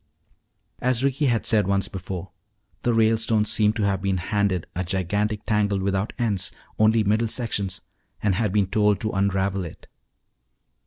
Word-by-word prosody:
As 125 0 +1
Ricky 140 +1 +1
had 120 -3 +1
said 105 -4 +2
once 100 0 +1
before, 95 -1 -6 0.5
the 120 - +1
Ralestones 110 -1 +2
seemed 105 0 +3
to 110 - -1
have 100 -2 0
been 95 -1 0
handed 100 -1 0
a 95 - -1
gigantic 100 +4 -1
tangle 105 -2 +1
without 95 +2 -1
ends, 105 -7 0 0.3
only 110 +1 +4
middle 110 +3 +2
sections, 100 -5 -2 0.4
and 105 -2 +1
had 105 +1 0
been 100 0 +2
told 105 +1 +2
to 110 - -1
unravel 95 0 0
it. 85 - -10
105 Hz, 155 wpm, -24 LUFS, 95-110 Hz, 0.5 s, only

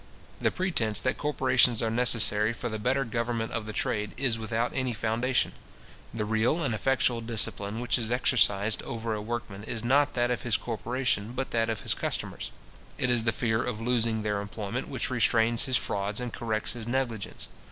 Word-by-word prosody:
The - - +4
pretence 145 - 0
that - - -1
corporations 130 -5 +3
are 115 -2 0
necessary 115 -2 +4
for 120 +1 -4
the 110 -1 -3
better 130 +5 +1
government 115 0 -2
of 110 -2 -3
the - - -3
trade, 105 0 -1
is 125 -4 0
without 115 +2 -1
any 130 -2 0
foundation. 115 +4 +1 0.6
The 110 -2 -2
real 110 +10 +1
and 130 -5 0
effectual 120 +1 +1
discipline 110 -2 -1
which 125 +1 +1
is 115 -1 -2
exercised 110 -4 +2
over 115 -1 -3
a 105 - -3
workman, 105 -3 -5
is 110 +1 -4
not 140 +4 +3
that 120 0 +2
of 120 -5 -1
his 115 -4 +2
corporation, 120 -1 -2
but 130 +1 -3
that 115 -1 +1
of 110 -3 -2
his - - 0
customers. - - -2 0.5
It 125 - +1
is 115 -2 +1
the 110 - +4
fear 110 0 0
of 125 -3 -3
losing 115 -2 +1
their 105 -1 0
employment 100 0 -4
which - - -3
restrains 115 0 +3
his 130 -2 +3
frauds 100 +2 -2
and 125 -2 -4
corrects 110 -2 -2
his 120 -2 -6
negligence. 120 -5 -2
115 Hz, 185 wpm, -28 LUFS, 110-125 Hz, 0.6 s, The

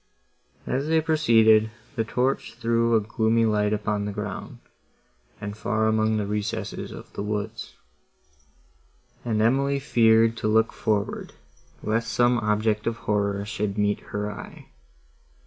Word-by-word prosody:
As 135 +3 -1
they 160 0 +3
proceeded, 115 -9 +4 0.3
the 115 - 0
torch 125 +3 -1
threw 115 0 +1
a - - +5
gloomy 110 +2 +1
light 105 -1 +1
upon 105 -1 -1
the 105 - -3
ground, 105 -1 -6 0.8
and 105 -1 -5
far 110 0 0
among 110 0 +2
the 105 - -1
recesses 105 0 -3
of - - -11
the - - -5
woods, 105 0 -4 1.5
and 110 -3 -1
Emily 140 +4 +2
feared 115 -4 +4
to 110 - -2
look 110 +1 +3
forward, 105 -2 -2 0.5
lest 115 +2 -1
some 120 0 +3
object 105 0 0
of 115 0 -1
horror 100 -1 0
should 105 -1 -3
meet 105 0 +1
her 105 0 -3
eye. 100 - -11
110 Hz, 135 wpm, -25 LUFS, 105-115 Hz, 1.5 s, a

